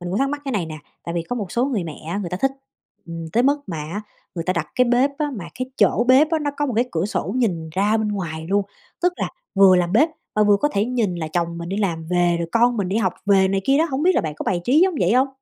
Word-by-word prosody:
mình 175 0 -5
cũng 195 - -1
thắc 275 0 +2
mắc 290 0 -3
cái 270 - -3
này 195 -7 -1
nè, 155 -1 -7 0.3
tại 170 - -4
vì 170 - -1
có 245 +9 -4
một 200 -6 -5
số 245 +2 +1
người 230 -10 -1
mẹ 160 -2 -6
á 185 +4 -2
người 185 -4 -4
ta 180 - -2
thích, 270 - +3 0.6
ừm, 165 -1 -6
tới 240 - +3
mức 285 +2 +3
mà 175 -5 -5
á 160 +7 -5 0.3
người 165 -2 -4
ta 185 - +1
đặt 170 -4 -2
cái 250 - +4
bếp 250 +3 +3
á 300 -1 -1
mà 190 - -6
cái 255 0 -4
chỗ 235 - +3
bếp 275 +5 +6
á 325 - +2
nó 295 -1 -1
có 290 - 0
một 260 - -2
cái 240 - +3
cửa 165 +1 0
sổ 210 - -3
nhìn 175 -10 -1
ra 205 +6 +1
bên 220 -1 -1
ngoài 165 -6 -4
luôn, 200 +1 +2 0.4
tức 360 0 +3
là - - -2 0.3
vừa 195 -2 +7
làm 175 0 0
bếp 280 +9 +5 0.3
mà 210 - +3
vừa 205 -1 +5
có 295 - +2
thể 200 - +1
nhìn 230 -6 -1
là 160 -2 -4
chồng 170 +1 -2
mình 170 0 -6
đi 195 - -3
làm 175 -6 -1
về, 175 -1 +2
rồi 170 -1 -3
con 240 +1 +3
mình 200 -4 -1
đi 195 - -1
học 190 -5 +1
về 195 -1 +4
này 195 0 0
kia 275 +4 +3
đó, 320 - +4
hổng 265 +2 -1
biết 365 +2 +4
là - - +3
bạn 155 -2 -4
có - - -6
bài 175 -2 0
trí 275 - +4
giống 370 0 +3
vậy 180 +3 +3
hông? 260 +3 +3
200 Hz, 310 wpm, -22 LUFS, 175-255 Hz, 0.6 s, vừa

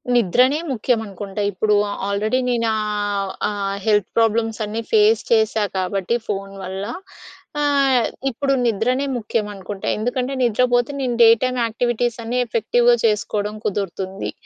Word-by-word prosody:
నిద్రనే 250 - +3
ముఖ్యం 245 -1 +1
అనుకుంటా. 200 0 -6
ఇప్పుడు 210 +2 +1 0.3
ఆల్రెడీ 215 +5 0
నేను 235 -2 +1
ఆహ్, 205 -2 -2 0.2
ఆ - - -3 0.3
హెల్త్ 210 -3 +3
ప్రాబ్లమ్స్ 225 0 +1
అన్నీ 215 +2 -3
ఫేస్ 215 +1 +4
చేశా 220 -1 +3
కాబట్టి 190 +3 -1
ఫోన్ 195 -1 -4
వల్ల. 190 +2 -5 0.8
ఆహ్, 275 -4 +3 0.3
ఇప్పుడు 275 +3 0
నిద్రనే 240 +5 +1
ముఖ్యం 220 -1 -2
అనుకుంటా. 195 0 -7
ఎందుకంటే 250 +4 -2
నిద్రపోతే 245 +2 +2
నేను 250 -2 -1
డే 225 - +8
టైమ్ 255 0 0
యాక్టివిటీస్ 240 +1 -1
అన్నీ 240 +2 -1
ఎఫెక్టివ్‍గా 240 +2 +3
చేసుకోవడం 210 -1 0
కుదురుతుంది. 195 -1 -3
220 Hz, 130 wpm, -21 LUFS, 205-245 Hz, 0.8 s, డే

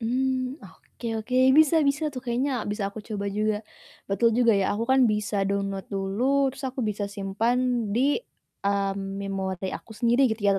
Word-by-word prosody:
Mmm, 255 +3 -1
oke 240 - -12 0.2
oke, 250 +1 -1 0.2
bisa 315 +1 +6
bisa 290 +3 0
tuh 255 - -5
kayaknya 255 +3 0 0.2
bisa 210 0 -3
aku 215 - -7
coba 205 -2 -3
juga. 215 0 +1 0.5
Betul 215 +4 +3
juga 235 -2 +5
ya, - - +1
aku 230 - -1
kan 265 - +5
bisa 210 0 -2
download 195 -1 -2
dulu, 195 +2 -3 0.3
terus 270 0 -9
aku 260 0 -5
bisa 210 -1 -2
simpan 200 +4 -1 0.4
di, 240 - +2 0.6
mmm, 195 -1 -1
memori 190 -1 -3
aku 220 - -8
sendiri, 240 +3 +3
gitu 220 -1 -3
ya, - - +5
215 Hz, 170 wpm, -26 LUFS, 195-250 Hz, 0.6 s, bisa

